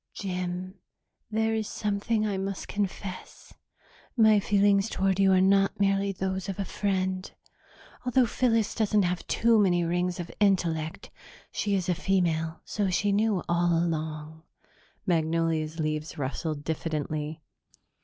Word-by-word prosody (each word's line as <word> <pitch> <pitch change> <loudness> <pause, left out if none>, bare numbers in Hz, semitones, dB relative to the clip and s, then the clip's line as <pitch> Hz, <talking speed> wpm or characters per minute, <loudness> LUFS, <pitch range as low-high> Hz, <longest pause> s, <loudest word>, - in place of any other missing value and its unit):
"Jim, 185 0 -4 0.5
there 220 0 +1
is 220 -1 -1
something 210 +1 -1
I 205 -2 -1
must 195 0 -4
confess: 195 -2 -5 0.6
my 220 -2 +6
feelings 200 0 +3
toward 195 -2 0
you 195 -1 +5
are 185 - +5
not 195 +1 +3
merely 195 0 +2
those 190 0 -3
of 195 - -4
a 200 - -2
friend. 185 -1 -1 0.7
Although 250 0 +3
Phyllis 230 -2 +1
doesn't 210 -2 +2
have 180 0 -2
too 230 -1 +3
many 175 -4 +3
rings 175 +1 -1
of 175 - -5
intellect, 170 -6 0 0.4
she 205 -1 0
is 185 -2 -1
a 180 - +2
female, 165 -3 0
so 205 -3 -1
she 200 +3 +1
knew 205 -2 +1
all 170 0 +2
along." 160 -1 -3 0.6
Magnolia's 165 -2 0
leaves 155 0 -2
rustled 145 +2 -3
diffidently. 155 -1 -3
185 Hz, 135 wpm, -27 LUFS, 165-200 Hz, 0.7 s, my